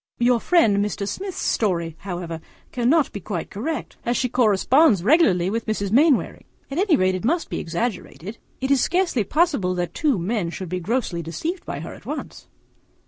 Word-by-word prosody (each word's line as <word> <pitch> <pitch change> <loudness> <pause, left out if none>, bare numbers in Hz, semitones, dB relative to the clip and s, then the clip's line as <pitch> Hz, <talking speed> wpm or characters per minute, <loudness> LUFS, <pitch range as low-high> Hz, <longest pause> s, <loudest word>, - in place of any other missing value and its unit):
Your 240 0 +3
friend 230 - +3
Mr. 205 -1 -3
Smith's 380 - -5
story, 170 -7 0
however, 175 -4 -5 0.3
cannot 260 +5 +2
be 200 - -6
quite 170 - -5
correct, 290 +10 -4
as 240 +1 0
she 250 - 0
corresponds 235 - +3
regularly 195 - +4
with 230 +1 -3
Mrs. 205 -2 -2
Mainwaring. 280 +3 +2 0.3
At 285 - -2
any 385 -4 +4
rate 185 -6 +2
it 185 - -4
must 330 +8 0
be - - -2
exaggerated. 195 +2 -4 0.2
It 265 +1 -1
is 275 -3 +4
scarcely 350 - +1
possible 275 - +1
that 175 -1 -3
two 290 -7 +1
men 185 0 -1
should 180 +1 -6
be 185 +1 -2
so - - -10
grossly 215 -6 -1
deceived 315 - -5
by - - -4
her - - -7
at - - -14
once. - - -6
225 Hz, 185 wpm, -23 LUFS, 185-285 Hz, 0.3 s, regularly